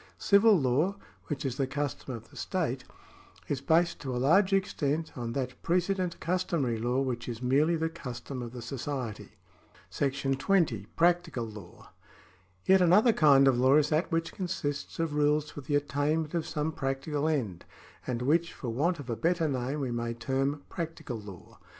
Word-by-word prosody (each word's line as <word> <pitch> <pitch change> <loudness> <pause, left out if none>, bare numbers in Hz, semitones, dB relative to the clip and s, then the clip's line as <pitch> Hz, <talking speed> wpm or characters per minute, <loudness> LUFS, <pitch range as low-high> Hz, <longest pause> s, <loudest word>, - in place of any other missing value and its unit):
Civil 200 -1 +5
law, 145 +9 +1 0.3
which 140 -2 -3
is 130 -2 -2
the 135 - 0
custom 140 -2 -3
of 115 -1 -11
the - - -17
state, - - -2 0.6
is 140 -2 -2
based 165 +4 +2
to 130 -3 -3
a - - -1
large 170 +10 +4
extent 165 -5 0
on 120 -2 -4
that 125 -1 -4
precedent 180 0 0
customary 165 -9 0
law 120 +3 0
which 125 -3 -2
is 115 -2 -5
merely 145 +7 +3
the 160 0 0
custom 130 -5 -7
of 120 -1 -6
the 120 -1 -8
society. 130 -2 -5 0.6
§ 135 -1 -1
20. 140 - +1
Practical 170 -7 +2
Law. 105 -5 -12 0.7
Yet 190 0 +5
another 205 +7 +5
kind 140 -5 +6
of 125 -2 +4
law 130 +2 +5
is 150 -1 +4
that 160 +4 0
which 165 0 -1
consists 170 -6 -3
of 165 -2 -1
rules 150 0 +2
for 145 - -8
the 145 +2 -1
attainment 145 +2 0
of 170 -2 -1
some 155 0 -1
practical 140 +2 -2
end, 120 - -1 0.4
and 125 -1 -2
which, 165 +5 +2
for 125 - -6
want 160 +10 +1
of 145 -4 -9
a 115 - -2
better 170 +3 +1
name, 135 +1 -2
we 130 -3 -2
may 120 0 -2
term 135 +5 -1
practical 165 -8 -5
law. 100 -4 -12
145 Hz, 175 wpm, -29 LUFS, 125-165 Hz, 0.7 s, kind